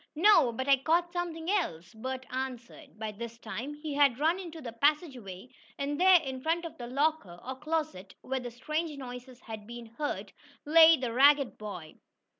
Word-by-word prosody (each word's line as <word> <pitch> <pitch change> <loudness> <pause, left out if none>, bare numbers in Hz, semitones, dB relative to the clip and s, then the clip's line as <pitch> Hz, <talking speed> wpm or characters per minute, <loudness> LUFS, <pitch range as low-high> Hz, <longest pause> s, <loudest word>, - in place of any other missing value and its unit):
"No, 325 - +5
but 260 +4 -4
I 275 -1 +6
caught 340 +6 +1
something 345 -1 -3
else," 180 - -2
Bert 260 +3 -5
answered. 260 +1 -6
By 220 0 -4
this 230 +2 -8
time 235 +6 -6
he 300 0 -6
had 280 -4 +4
run 325 +6 +2
into 335 -3 -8
the 250 -6 -7
passageway, 250 - -1 0.3
and 285 +3 -2
there, 370 -1 +8
in 265 -1 -5
front 330 +4 0
of 330 - -7
the 240 - -6
locker, 270 - -1
or 260 +1 -4
closet, 305 - -3
where 265 0 -3
the 245 -1 -6
strange 305 +6 -3
noises 250 -1 -9
had 215 -2 -9
been 240 0 -8
heard, 295 - -3 0.3
lay 320 +1 +8
the 250 -3 -3
ragged 280 +1 +5
boy. 180 -7 -8
265 Hz, 180 wpm, -30 LUFS, 235-315 Hz, 0.3 s, there